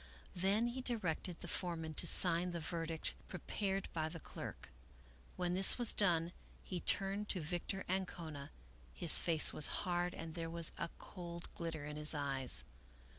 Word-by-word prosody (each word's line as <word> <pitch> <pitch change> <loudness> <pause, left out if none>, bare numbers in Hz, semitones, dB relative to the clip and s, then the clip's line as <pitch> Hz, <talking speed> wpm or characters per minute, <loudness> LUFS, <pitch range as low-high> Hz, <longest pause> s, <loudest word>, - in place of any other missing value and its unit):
Then 200 +6 0
he 255 +2 -6
di 250 -1 +1
rected 180 -3 -5
the - - -8
foreman 165 -3 -4
to - - +1
sign 175 +1 +6
the 170 - -4
verdict 165 0 -4
prepared 195 +1 -4
by 160 -1 -3
the 165 - -9
clerk. - - -10 0.6
When 180 -1 -3
this 190 +1 +6
was 240 -2 +3
done 170 -4 0 0.3
he 180 - -6
turned 195 +3 0
to 185 - -2
Victor 175 +4 -5
Ancona; 170 -6 -5 0.5
his - - +4
face 160 -2 +5
was 150 - +7 0.2
hard 175 0 -2
and 165 -1 -8
there 165 0 -6
was 170 -1 +2
a 170 - -4
cold 170 -2 -9
glitter 160 -3 -6
in 150 0 -8
his 150 +1 +2
eyes. 135 -3 +4
170 Hz, 165 wpm, -35 LUFS, 160-190 Hz, 0.6 s, was